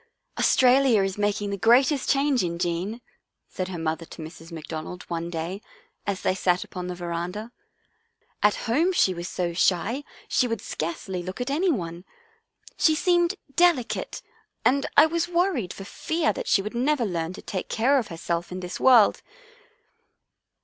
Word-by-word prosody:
" - - -15
Australia 255 -4 +5
is 195 -1 -2
making 205 0 -1
the 200 - -2
greatest 260 +6 +4
change 275 -3 +2
in 170 -1 -2
Jean," 180 +7 -2 0.5
said 185 - -4
her 185 -2 -5
mother 160 0 -2
to 165 - -10
Mrs. 165 +1 -11
McDonald 160 +2 -6
one 170 0 -3
day, 175 +4 -4 0.5
as 200 -2 -1
they - - +1
sat 180 -1 +1
upon 180 -2 -7
the 180 - -4
veranda. 175 +6 -4 0.5
" 460 +1 -43
At 210 0 +4
home 315 +11 +2
she 190 - +3
was 175 0 -5
so 175 -1 -2
shy 195 +10 +1 0.2
she 250 - +2
would 230 -2 -2
scarcely 175 +3 -4
look 185 +4 -7
at 250 +2 -2
any 345 +7 +2
one. 170 - -4 0.7
She 315 - +4
seemed 345 +3 +2 0.2
delicate 345 -9 +1 0.4
and 275 +2 +3
I 295 - +9
was 335 +1 0
worried 345 - 0
for 195 - -8
fear 320 - -1
she 195 - +3
would 210 - -5
never 255 +1 +1
learn 170 -3 -2
to - - -9
take 185 - -4
care 265 +5 +3
of 235 - -4
herself 170 0 -3
in 185 - -4
this 180 0 -6
world." 245 -5 +6
200 Hz, 170 wpm, -25 LUFS, 175-270 Hz, 0.7 s, I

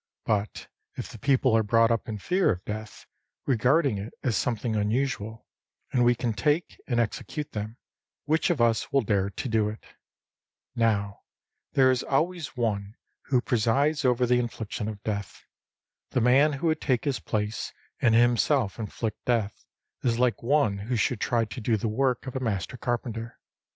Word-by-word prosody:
But 105 -1 -1 0.3
if - - -5
the 115 - -10
people 130 -3 +3
are 115 - +5
brought 115 +2 +3
up 115 0 -1
in 110 - -3
fear 180 - +1
of 90 -2 -5
death, 105 0 -6 0.4
regarding 130 -1 +2
it 105 +4 -7
as 120 -4 +1
something 115 +1 -1
unusual, 110 0 -1 0.5
and 125 - +3
we 120 0 +4
can 120 -1 -1
take 150 +8 0
and 120 -3 +1
execute 140 +6 -3
them, 110 +2 -5 0.5
which 160 +4 +2
of 170 -6 +1
us 115 -1 +2
will 140 - +4
dare 100 -2 +1
to 100 - -5
do 110 -3 +2
it? 110 - -8 0.9
Now, 100 -3 +1 0.5
there 130 -1 +5
is 130 - +1
always 160 +1 -1
One 105 -3 -1 0.3
who 130 -3 +2
presides 135 +7 +1
over 125 -1 +3
the 125 0 +3
infliction 115 -2 -4
of 105 -2 -6
death. 105 -3 -4 0.7
The 125 - 0
man 135 +6 +5
who 140 +4 -4
would 160 -1 +1
take 130 -2 +1
his 140 -3 0
place 105 0 -2 0.3
and 115 -2 +4
himself 120 -1 +3
inflict 110 0 -4
death, 115 -4 -1 0.3
is 115 -2 +1
like 125 -1 +1
one 120 -5 +2
who 115 +5 -2
should 110 +1 0
try 115 -2 +1
to 110 +3 -8
do 110 0 +1
the 110 - -2
work 125 +3 0
of 130 - -6
a - - 0
master 110 -3 -2
carpenter. 120 -1 -3
120 Hz, 170 wpm, -27 LUFS, 110-130 Hz, 0.9 s, are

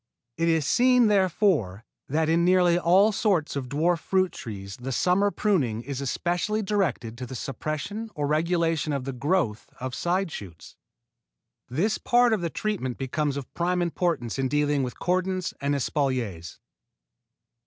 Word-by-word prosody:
It 165 - 0
is 160 -3 +2
seen, 250 - +4
therefore, 180 - +1 0.2
that 155 +3 +1
in 165 +1 +3
nearly 180 -1 +4
all 190 +5 +5
sorts 195 -8 0
of 130 -3 -4
dwarf 165 +5 +1
fruit 185 +1 +1
trees 100 -4 -8
the 130 +2 -5
summer 185 +9 +2
pruning 140 - 0
is 140 0 -5
especially 175 - -1
directed 150 - -1
to 125 - -5
the 130 - -7
suppression 155 - -4
or 145 - -1
regulation 165 0 +1
of 140 -2 -2
the 135 +1 -4
growth 130 - -1
of 130 0 -4
side 180 +4 -1
shoots. 90 - -9 0.9
This 195 - 0
part 245 -1 +3
of 210 - 0
the 170 - -1
treatment 175 - -3
becomes 140 +2 -2
of 140 - -7
prime 180 +1 0
importance 170 -8 -1
in 135 - +1
dealing 145 0 +1
with 125 -2 -4
cordons 185 0 -1
and 140 +1 +1
espaliers. 125 - -2
160 Hz, 155 wpm, -26 LUFS, 130-185 Hz, 0.9 s, all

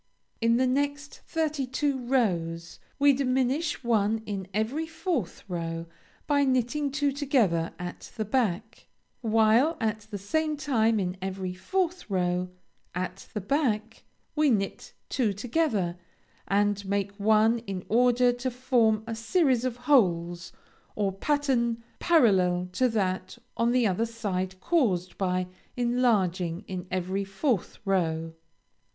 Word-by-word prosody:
In 230 +1 +4
the 260 - +3
next 285 +2 -1
thirty 305 -4 -1
two 275 +1 0
rows 175 -10 -1 0.2
we 285 0 +5
diminish 265 +3 0
one 220 -1 +1
in 195 -3 -4
every 230 +11 -1
fourth 320 - -3
row, 165 -2 -4 0.4
by 285 -1 +3
knitting 260 +2 +1
two 285 0 +1
together 245 - +1
at 175 0 -7
the 215 - -1
back, 220 -1 -1 0.3
while 225 +7 +3
at 220 -1 -2
the 205 - -4
same 305 +10 -1
time 230 -7 +2
in 180 -1 -2
every 190 -1 -3
fourth 360 - -2
row, 180 -1 0 0.5
at 185 +1 -4
the 210 - -1
back, 225 -2 -1 0.3
we 305 -1 +3
knit 195 -5 -1
two 230 -6 0
together, 210 - -1 0.5
and 205 +1 +1
make 200 0 -1
one 220 +2 +4
in 190 -2 -4
order 245 +1 +4
to 245 +2 -3
form 240 -4 +2
a 230 - -4
series 250 +2 +2
of 250 -2 -2
holes, 180 -10 +2 0.4
or 200 -2 0
pattern 235 0 0 0.2
parallel 185 - +3
to 255 +6 +2
that 190 -2 -1 0.2
on 230 +1 +2
the 250 -1 +3
other 215 +3 +1
side 190 -5 -3
caused 190 - +1
by 185 -1 0 0.3
enlarging 210 -8 +1
in 185 -1 -5
every 185 +2 -1
fourth 195 - -1
row. 165 -4 0
225 Hz, 130 wpm, -27 LUFS, 190-260 Hz, 0.5 s, we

